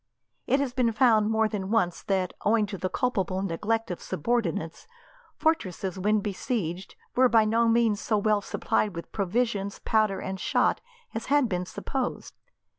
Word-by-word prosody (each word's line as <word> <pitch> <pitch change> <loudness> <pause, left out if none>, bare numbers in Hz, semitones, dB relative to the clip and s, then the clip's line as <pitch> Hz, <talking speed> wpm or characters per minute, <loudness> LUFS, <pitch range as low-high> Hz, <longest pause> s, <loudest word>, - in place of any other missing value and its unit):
It 270 - +3
has 275 -3 -1
been 250 -3 +2
found 220 -2 +4
more 220 0 +2
than 195 -3 -4
once 180 -6 +1
that, 190 -2 -1
owing 215 0 +3
to 200 -1 -6
the 185 - -1
culpable 190 -4 -1
neglect 210 +5 -1
of 175 - -5
subordinates, 165 -5 -2 0.5
fortresses 190 - -1
when 210 +2 +2
besieged 195 -3 -3 0.2
were 255 0 +5
by 225 -2 +5
no 230 +2 +2
means 225 -2 +2
so 215 - +1
well 210 0 +2
supplied 205 -1 -1
with 170 - -7
provisions, 200 0 -1
powder 215 -3 +1
and 190 0 -5
shot, - - +1 0.3
as 225 - -5
had 285 -2 +3
been 180 -3 -2
supposed. 260 +5 -4
215 Hz, 160 wpm, -27 LUFS, 190-230 Hz, 0.5 s, were